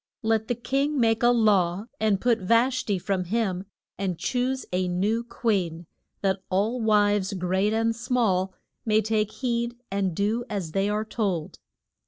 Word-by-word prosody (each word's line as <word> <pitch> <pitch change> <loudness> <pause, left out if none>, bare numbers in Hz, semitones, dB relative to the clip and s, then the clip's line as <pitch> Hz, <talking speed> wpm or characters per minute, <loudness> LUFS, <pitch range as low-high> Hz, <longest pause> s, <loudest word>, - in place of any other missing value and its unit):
Let 220 0 +1
the 245 - 0
king 275 +4 0
make 225 -2 +3
a 240 - +5
law 205 -5 +3
and 210 -3 +2
put 235 0 +2
Vash 235 +6 +2
ti 200 -3 0
from 185 0 -2
him 195 -2 -1 0.3
and 190 -3 -1
choose 255 +5 -1
a 180 0 +1
new 205 +6 0
queen, 185 -9 -1 0.4
that 190 -1 0
all 210 +6 0
wives, 205 -2 +2
great 190 +2 0
and 225 +1 +1
small, 225 -6 +1 0.3
may 215 -2 +2
take 215 0 +1
heed 235 -2 -2 0.2
and 195 -3 -1
do 215 +5 0
as 195 -6 -3
they 195 +4 +1
are 210 +1 -1
told. 195 -8 -2
215 Hz, 160 wpm, -26 LUFS, 190-235 Hz, 0.4 s, a